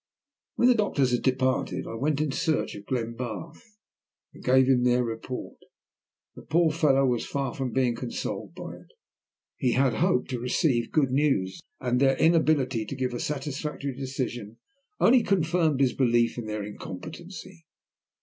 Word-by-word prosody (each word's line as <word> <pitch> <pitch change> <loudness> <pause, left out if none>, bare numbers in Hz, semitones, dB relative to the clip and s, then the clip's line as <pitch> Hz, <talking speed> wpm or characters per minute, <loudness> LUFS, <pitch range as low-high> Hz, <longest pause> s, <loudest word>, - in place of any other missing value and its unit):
When 240 - +4
the 250 - +7
doctors 155 - +1
had 120 - +1
departed 130 0 0
I - - -6
went 140 +5 0
in 155 -2 0
search 155 +3 0
of 100 0 -10
Glenbarth, 120 - -5 0.6
and - - -14
gave 130 +1 +5
him 130 -2 +3
their 125 0 +3
report. 115 +2 -6 0.7
The - - -11
poor 165 +1 +2
fellow 140 -4 +3
was 125 -3 +1
far 135 -2 -3
from 130 -3 -3
being 125 0 +1
consoled 120 0 -5
by - - -7
it. - - -18 0.7
He 125 -2 +1
had 130 -2 +3
hoped 125 +4 +1
to 125 - -2
receive 125 -1 +1
good 140 -5 +2
news, 130 -10 +1 0.2
and 125 -1 0
their 135 0 +3
inability 155 -8 +3
to 140 - -5
give 130 -1 -2
a 120 - -3
satisfactory 145 -1 -4
decision 125 -5 -4 0.4
only 250 +1 +6
confirmed 165 -7 +1
his 130 -2 +3
belief 120 -3 +2
in 120 -3 -5
their 105 -1 -3
incompetency. 165 - -9
130 Hz, 160 wpm, -27 LUFS, 120-150 Hz, 0.7 s, the